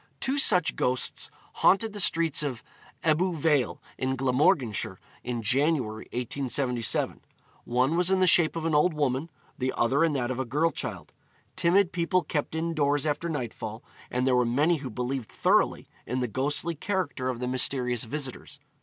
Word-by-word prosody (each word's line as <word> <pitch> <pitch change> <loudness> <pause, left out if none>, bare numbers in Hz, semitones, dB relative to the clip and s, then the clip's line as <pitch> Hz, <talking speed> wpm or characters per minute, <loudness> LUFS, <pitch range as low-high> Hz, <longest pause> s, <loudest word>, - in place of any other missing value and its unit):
Two 270 +2 0
such 180 - +4
ghosts 125 0 -1 0.3
haunted 215 +2 +4
the 205 - -6
streets 165 -5 +2
of 135 -6 -4 0.4
Ebbw 165 +3 +2
Vale, 145 -5 +1 0.2
in 130 0 0
Glamorganshire, 130 -3 +1 0.2
in 120 -2 -3
January, 125 -2 +1
1877. 125 -1 -1 0.4
One 130 +6 +1
was 180 +1 +2
in 190 0 +3
the 185 - +4
shape 170 -2 +5
of 165 -1 -3
an 165 - 0
old 155 +3 +3
woman, 145 +1 -1 0.3
the 130 +1 0
other 135 +7 +2
in 165 -2 +2
that 125 -3 -1
of 130 - -4
a - - +1
girl 150 +7 +1
child. - - -6 0.4
Timid 180 +2 +3
people 180 +1 +1
kept 150 +1 -3
indoors 155 -3 0
after 155 +3 -1
nightfall, 115 -6 -5 0.3
and 125 +1 -1
there 130 -1 +3
were 125 - +4
many 145 +8 +2
who 135 -3 -6
believed 125 +1 -4
thoroughly - - +1 0.2
in 125 +3 -2
the 125 - -1
ghostly 145 +8 -1
character 165 -7 -2
of 125 -2 -3
the 125 - -3
mysterious 125 -2 +1
visitors. 140 +2 -5
140 Hz, 165 wpm, -27 LUFS, 125-165 Hz, 0.4 s, shape